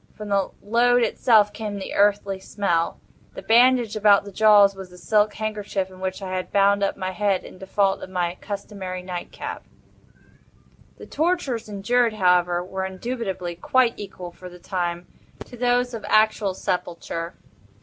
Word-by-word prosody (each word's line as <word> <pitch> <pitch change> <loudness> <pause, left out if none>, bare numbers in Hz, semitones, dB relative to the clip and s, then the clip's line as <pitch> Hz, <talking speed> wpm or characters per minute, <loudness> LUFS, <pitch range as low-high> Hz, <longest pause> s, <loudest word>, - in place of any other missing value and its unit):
From 210 -1 -8
the 200 -1 +1
load 240 +3 +3
itself 215 -2 +3
came 210 -2 -5
the 195 - -6
earthly 200 -1 +2
smell. 180 -4 -1 0.4
The - - -8
bandage 240 -1 +4
about 210 -1 +5
the 200 - -10
jaws 205 -1 +6
was 190 -1 -10
a 180 - -14
silk 210 +4 +1
handkerchief 210 -3 -3
in 185 - -14
which 190 +1 -4
I 185 - -5
had 185 - -4
bound 200 0 +3
up 200 - 0
my 185 0 -3
head, 195 0 0
in - - -12
default 195 0 0
of - - -8
my 180 -2 -2
customary 195 -3 -6
nightcap. 180 -1 -6 1.3
The - - -11
tortures 300 -9 -1
endured, 225 +3 +1
however, 180 -3 +2
were 190 +1 -4
indubitably 190 -2 -4
quite 235 +8 +2
equal 190 -3 -8
for 180 +1 -11
the 180 - -13
time, 175 -1 -3 0.4
to - - -12
those 245 0 +1
of 225 - -6
actual 215 -3 +3
sepulture. 170 -1 -4
200 Hz, 160 wpm, -23 LUFS, 185-215 Hz, 1.3 s, jaws